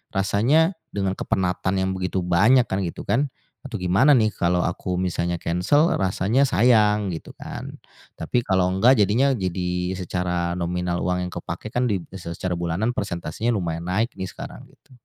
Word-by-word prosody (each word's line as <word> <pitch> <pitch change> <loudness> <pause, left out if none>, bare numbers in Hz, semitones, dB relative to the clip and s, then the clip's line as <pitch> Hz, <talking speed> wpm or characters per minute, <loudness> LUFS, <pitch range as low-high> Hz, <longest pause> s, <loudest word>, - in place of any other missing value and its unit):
rasanya 135 - +2 0.2
dengan 95 -2 0
kepenatan 95 0 -1
yang 95 0 0
begitu 95 0 -2
banyak 110 +9 +4
kan 95 - -1
gitu 85 - -6
kan, 125 +8 +1 0.4
atau 115 -6 -5
gimana 95 +11 +4
nih 110 -3 +4
kalau 90 0 +1
aku 90 +1 -2
misalnya 85 -1 -1
cancel 105 - +2
rasanya 95 +7 +1
sayang 105 -4 +3
gitu - - -9
kan. - - -8 0.4
Tapi 120 -1 0
kalau 95 -2 +2
enggak 115 +6 +4
jadinya 120 +7 +3
jadi 90 -1 -2
secara 90 -1 -2
nominal 90 0 -2
uang 90 0 0
yang - - -14
kepake 85 +5 -6
kan 125 0 +1
di 95 -4 -1
secara 90 0 -4
bulanan 85 +8 -1
persentasenya 100 +4 -2
lumayan 85 -2 -3
naik 110 +6 0
nih 95 - -3
sekarang - - -10
gitu. - - -27
95 Hz, 160 wpm, -23 LUFS, 90-110 Hz, 0.4 s, banyak